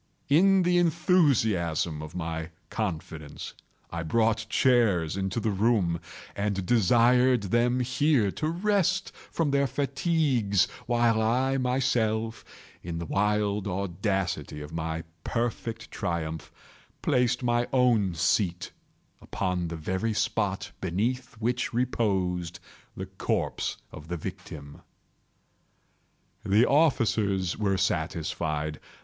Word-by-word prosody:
In 190 Hz, +6 st, +5 dB
the 175 Hz, 0 st, +3 dB
enthusiasm 120 Hz, -, +2 dB
of 80 Hz, +1 st, -9 dB
my 80 Hz, -2 st, -4 dB, 0.2 s
confidence, 80 Hz, -7 st, -5 dB, 0.4 s
I 85 Hz, -, -3 dB
brought 110 Hz, +5 st, +1 dB
chairs 110 Hz, -, +3 dB
into 95 Hz, +2 st, -2 dB
the 110 Hz, -1 st, 0 dB
room, 100 Hz, -5 st, +1 dB, 0.4 s
and 100 Hz, -2 st, -1 dB
desired 120 Hz, +3 st, +4 dB
them 120 Hz, +5 st, +1 dB
here 130 Hz, -4 st, +2 dB
to 155 Hz, -, -3 dB
rest 190 Hz, +1 st, +1 dB, 0.2 s
from 160 Hz, -4 st, 0 dB
their 140 Hz, 0 st, +2 dB
fatigues, 135 Hz, -, +1 dB, 0.2 s
while 120 Hz, -2 st, +2 dB
I 130 Hz, +4 st, +1 dB
myself, 115 Hz, -3 st, 0 dB, 0.4 s
in 85 Hz, -1 st, -5 dB
the 85 Hz, -, -4 dB
wild 105 Hz, +2 st, 0 dB
audacity 95 Hz, -, -2 dB
of 75 Hz, +1 st, -9 dB
my 80 Hz, 0 st, -3 dB, 0.2 s
perfect 115 Hz, -1 st, -3 dB
triumph, 80 Hz, -2 st, -3 dB, 0.5 s
placed 125 Hz, 0 st, +1 dB
my 120 Hz, 0 st, +1 dB
own 115 Hz, -8 st, +3 dB
seat 90 Hz, +1 st, 0 dB, 0.5 s
upon 90 Hz, -2 st, -2 dB
the 85 Hz, -, -5 dB
very 95 Hz, +7 st, -2 dB
spot 100 Hz, -2 st, -1 dB
beneath 115 Hz, +8 st, -2 dB
which 120 Hz, +2 st, -2 dB
reposed 95 Hz, -8 st, -1 dB, 0.4 s
the 95 Hz, -, -4 dB
corpse 95 Hz, 0 st, -2 dB
of 75 Hz, -, -10 dB
the 85 Hz, +1 st, -3 dB
victim. 80 Hz, -5 st, -8 dB, 1.6 s
The 105 Hz, +5 st, +4 dB
officers 110 Hz, -, +2 dB
were 100 Hz, -3 st, 0 dB
satisfied. 80 Hz, -3 st, -2 dB
105 Hz, 105 wpm, -27 LUFS, 90-125 Hz, 1.6 s, In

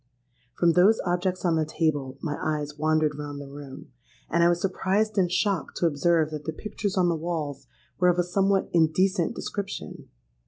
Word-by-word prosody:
From 170 Hz, -1 st, +4 dB
those 190 Hz, +6 st, +5 dB
objects 180 Hz, +1 st, -1 dB
on 165 Hz, -2 st, +2 dB
the 160 Hz, -, +2 dB
table 145 Hz, -4 st, -1 dB
my 150 Hz, -2 st, -2 dB
eyes 150 Hz, -1 st, -2 dB
wandered 155 Hz, -1 st, +1 dB
round 145 Hz, -1 st, -6 dB
the 140 Hz, -, -7 dB
room; 140 Hz, -2 st, -10 dB, 0.4 s
and 170 Hz, +1 st, +3 dB
I 170 Hz, -, +6 dB
was 175 Hz, 0 st, +1 dB
surprised 195 Hz, +3 st, 0 dB
and 180 Hz, -2 st, +2 dB
shocked 190 Hz, -2 st, 0 dB
to -, -, +1 dB
observe 160 Hz, 0 st, +2 dB
that 150 Hz, -1 st, -6 dB
the 160 Hz, -, -3 dB
pictures 205 Hz, +2 st, -4 dB
on 180 Hz, -1 st, +4 dB
the 170 Hz, -, +2 dB
walls 155 Hz, -4 st, -4 dB, 0.3 s
were 180 Hz, -1 st, +5 dB
of 175 Hz, -, +2 dB
a 175 Hz, -, +3 dB
somewhat 195 Hz, +2 st, +1 dB
indecent 175 Hz, +4 st, +2 dB
description. 200 Hz, -1 st, -6 dB
170 Hz, 185 wpm, -26 LUFS, 155-185 Hz, 0.4 s, I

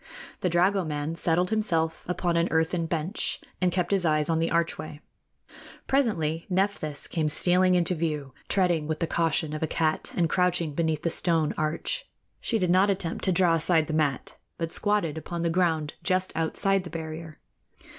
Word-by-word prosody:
The 180 Hz, -, 0 dB
dragoman 170 Hz, -4 st, +1 dB
settled 175 Hz, +3 st, +1 dB
himself 165 Hz, -7 st, +1 dB
upon 175 Hz, -1 st, -1 dB
an 170 Hz, +1 st, +2 dB
earthen 165 Hz, +1 st, 0 dB
bench 165 Hz, +4 st, -2 dB, 0.2 s
and 180 Hz, -1 st, +3 dB
kept 180 Hz, 0 st, -1 dB
his 195 Hz, -2 st, +2 dB
eyes 155 Hz, -1 st, +2 dB
on 160 Hz, -, +1 dB
the 165 Hz, -, +1 dB
archway. 165 Hz, -3 st, -2 dB, 0.9 s
Presently 170 Hz, -, 0 dB
Nephthys 185 Hz, -6 st, -1 dB
came 155 Hz, -3 st, -1 dB
stealing 180 Hz, +4 st, +3 dB
into 175 Hz, 0 st, +3 dB
view, 150 Hz, -5 st, -3 dB, 0.2 s
treading 175 Hz, -5 st, +2 dB
with 155 Hz, -1 st, -2 dB
the -, -, +1 dB
caution 160 Hz, -2 st, 0 dB
of 155 Hz, -, -4 dB
a 160 Hz, -, 0 dB
cat 155 Hz, 0 st, -1 dB
and 170 Hz, -2 st, +3 dB
crouching 180 Hz, -1 st, +1 dB
low -, -, -9 dB
beneath 160 Hz, -2 st, 0 dB
the 170 Hz, -, 0 dB
stone 165 Hz, -3 st, +2 dB
arch. 160 Hz, -, -2 dB, 0.3 s
She 230 Hz, -, 0 dB
did 180 Hz, -4 st, +1 dB
not 190 Hz, +3 st, +4 dB
attempt 185 Hz, -4 st, -2 dB
to 190 Hz, -, +2 dB
draw 180 Hz, -1 st, +3 dB
aside 165 Hz, 0 st, +3 dB
the 155 Hz, -, -5 dB
mat, 150 Hz, -4 st, -1 dB, 0.2 s
but 165 Hz, -1 st, -3 dB
squatted 175 Hz, -8 st, 0 dB
upon 170 Hz, +1 st, -5 dB
the 170 Hz, -, +1 dB
ground 165 Hz, -4 st, +1 dB
just 185 Hz, 0 st, 0 dB
outside 195 Hz, +4 st, +1 dB
the 180 Hz, -, -8 dB
barrier. 160 Hz, -1 st, -7 dB
165 Hz, 175 wpm, -27 LUFS, 160-180 Hz, 0.9 s, not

